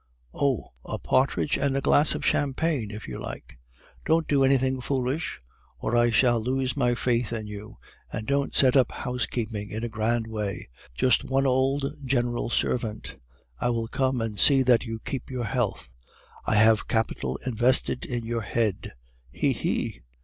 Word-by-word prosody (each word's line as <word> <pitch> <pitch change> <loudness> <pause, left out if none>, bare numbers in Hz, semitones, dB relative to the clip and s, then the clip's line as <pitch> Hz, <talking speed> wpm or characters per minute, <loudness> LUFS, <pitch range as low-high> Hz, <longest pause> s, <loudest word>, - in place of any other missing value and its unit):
"'Oh! 135 -6 0
a - - -4
partridge 135 +2 +1
and 140 -1 +1
a - - +2
glass 145 +2 +3
of - - -4
champagne 140 -4 0
if 105 +1 -8
you 65 - -6
like.' - - -8 0.4
"'Don't 160 0 +2
do 140 -2 +3
anything 130 -1 +2
foolish, 130 - -2 0.4
or 120 - -2
I 120 0 +4
shall 120 0 +3
lose 130 +2 -1
my 125 -3 +2
faith 120 -2 0
in 110 -2 -3
you. 105 +1 -9 0.3
And 110 - -4
don't 140 +2 0
set 130 -1 +5
up 130 -2 +4
housekeeping 115 -4 -3
in 110 +2 -4
a 120 - -2
grand 115 +1 0
way. 105 -3 -4 0.3
Just 125 - +3
one 135 +1 +1
old 135 +2 +1
general 120 -3 0
servant. 115 -3 -1 0.5
I - - +1
will 115 -1 -1
come 130 -1 0
and 110 -3 -3
see 135 -2 +6
that 125 -1 +4
you 115 0 -4
keep 130 -3 -4
your 125 -2 -3
health. 110 - -2 0.6
I - - +2
have 110 0 +5
capital 85 - -1
invested 125 +1 +1
in 120 -2 -4
your 115 0 -2
head, 110 - -1 0.4
he! - - +1
he! - - -2
120 Hz, 165 wpm, -26 LUFS, 110-135 Hz, 0.6 s, see